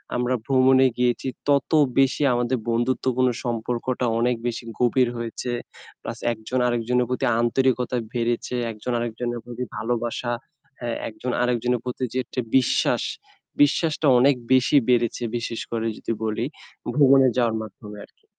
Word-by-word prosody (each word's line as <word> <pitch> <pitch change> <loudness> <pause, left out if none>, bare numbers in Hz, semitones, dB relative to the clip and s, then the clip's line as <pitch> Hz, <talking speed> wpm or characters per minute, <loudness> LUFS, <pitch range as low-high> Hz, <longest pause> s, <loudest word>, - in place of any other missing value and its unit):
আমরা 125 +1 +1
ভ্রমণে 130 0 +5
গিয়েছি 125 +1 0 0.2
তত 140 -1 +2 0.3
বেশি 135 +2 +3
আমাদের 120 +1 0
বন্ধুত্বপূর্ণ 130 +2 +1 0.2
সম্পর্কটা 120 +2 -2
অনেক 125 +1 +2
বেশি 120 0 -3 0.2
গভীর 125 +1 +3
হয়েছে। 115 +1 -4 0.5
প্লাস - - -6 0.2
একজন 115 +3 -3
আরেকজনের 120 +1 +1
প্রতি 125 +1 -1 0.2
আন্তরিকতা 125 +1 +1 0.2
বেড়েছে 120 0 -1 0.2
একজন 110 +3 -5
আরেকজনের 120 +1 -3
প্রতি 120 +1 -5
ভালোবাসা 120 +2 -2 0.5
হ্যাঁ 120 -1 -3
একজন 120 +3 -5
আরেকজনের 125 0 +1
প্রতি 125 +1 -4
যে - - -2
একটি 125 - -4 0.2
বিশ্বাস, 130 -2 +2 0.6
বিশ্বাসটা 155 +1 +2
অনেক 140 +2 +5 0.2
বেশি 130 +3 +3
বেড়েছে 120 -1 +2
বিশেষ 115 0 -4
করে 115 -1 -2
যদি - - -4
বলি 110 +1 -1 0.5
ভ্রমণে 135 -2 +6
যাওয়ার 115 -3 +2
মাধ্যমে 105 0 -10
আর - - -31
কি। - - -36
125 Hz, 135 wpm, -24 LUFS, 115-130 Hz, 0.6 s, ভ্রমণে